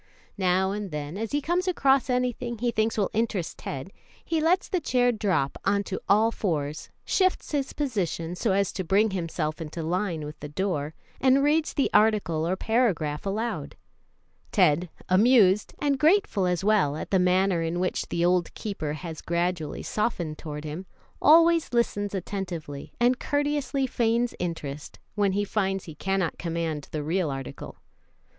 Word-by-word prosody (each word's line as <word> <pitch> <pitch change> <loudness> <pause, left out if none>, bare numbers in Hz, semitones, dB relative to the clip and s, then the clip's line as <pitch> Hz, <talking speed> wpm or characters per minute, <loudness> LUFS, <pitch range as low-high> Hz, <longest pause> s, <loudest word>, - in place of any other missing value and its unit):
Now 190 +1 +2
and 205 -1 -4
then, 150 0 -5
as 220 +2 -4
he 290 - 0
comes 355 +4 0
across 275 -7 +3
anything 250 -1 -1
he 240 +2 0
thinks 220 0 0
will 205 - +1
interest 210 -6 -1
Ted, 140 +8 -6 0.3
he 325 -2 0
lets 350 +4 +2
the 370 - 0
chair 245 -3 +2
drop 195 - 0
on 200 +1 +2
to 190 - -5
all 215 +3 +5
fours, 155 -8 -2 0.2
shifts 375 -1 +1
his 280 -3 -1
position 185 - -2
so 200 +4 0
as 195 0 +1
to 190 - -3
bring 200 +5 +3
himself 165 -3 -3
into 160 +1 -5
line 170 -2 -1
with 150 0 -9
the 150 - -7
door, 155 -3 -2 0.2
and 265 +1 +4
reads 305 +2 +2
the 275 - +1
article 200 -7 +3
or 185 - +1
paragraph 195 -9 0
aloud. 220 +4 -3 0.8
Ted, 175 -3 +3 0.2
amused, 205 0 +4
and 280 -2 +1
grateful 315 - +3
as 180 +1 0
well 200 -9 +3
at - - -6
the 190 - +4
manner 180 0 +3
in 165 +1 -1
which 185 0 -1
the 170 0 +1
old 180 -1 +2
keeper 175 -8 -4
has 160 0 -7
gradually 170 -2 -2
softened 175 -8 -2
toward 150 -1 -6
him, 160 +5 -6 0.3
always 330 -1 +5
listens 205 -4 0
attentively, 175 -7 -5
and 245 +1 +3
courteously 290 -1 0
feigns 235 -1 +1
interest, 150 -4 -5 0.2
when 200 -1 +1
he 205 +1 +1
finds 195 -2 -1
he 160 - -8
cannot 190 +1 -1
command 165 -3 -3
the 155 -1 -3
real 165 +1 0
article. 135 -1 -6
Mrs. - - -35
195 Hz, 165 wpm, -26 LUFS, 165-235 Hz, 0.8 s, all